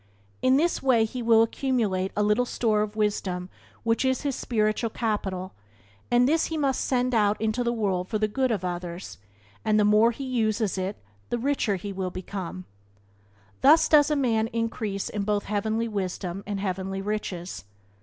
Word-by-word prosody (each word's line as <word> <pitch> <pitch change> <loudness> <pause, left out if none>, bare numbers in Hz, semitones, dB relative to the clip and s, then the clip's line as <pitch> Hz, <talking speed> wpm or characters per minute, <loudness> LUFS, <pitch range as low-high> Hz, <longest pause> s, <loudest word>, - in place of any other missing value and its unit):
In 260 +1 +4
this 335 +4 +1
way 245 -4 +4
he 245 +3 -5
will 225 -1 +5
accumulate 225 -7 0
a 210 - +3
little 210 +4 +3
store 215 -4 +1
of 210 0 -3
wisdom 190 -4 -1 0.3
which 230 +2 +1
is 260 -1 +1
his 280 -3 -1
spiritual 215 0 0
capital, 195 -5 -3 0.6
and 245 +1 +4
this 320 +3 +2
he 320 - -3
must 275 -3 +1
send 255 -1 0
out 210 -2 +2
into 220 +3 0
the 235 - +1
world 195 -6 -1
for 215 - -1
the 215 0 +1
good 260 +5 0
of 205 -6 -1
others, 175 - -5 0.4
and 215 0 +3
the 210 - +4
more 210 +2 +5
he 240 +4 -5
uses 220 -5 0
it 190 +2 -3 0.3
the 240 - 0
richer 240 -5 0 0.2
will 190 -1 -2
he - - -16
become. 185 -1 -6 1.0
Thus 315 +3 +6
does 300 -1 +5
a 300 - +2
man 230 -5 +1
increase 225 -3 -2
in 210 - -3
both 205 0 0
heavenly 220 +2 -1
wisdom 190 -2 -4
and 205 -1 -2
heavenly 195 0 -3
riches. 195 -4 -4
215 Hz, 175 wpm, -26 LUFS, 195-245 Hz, 1.0 s, Thus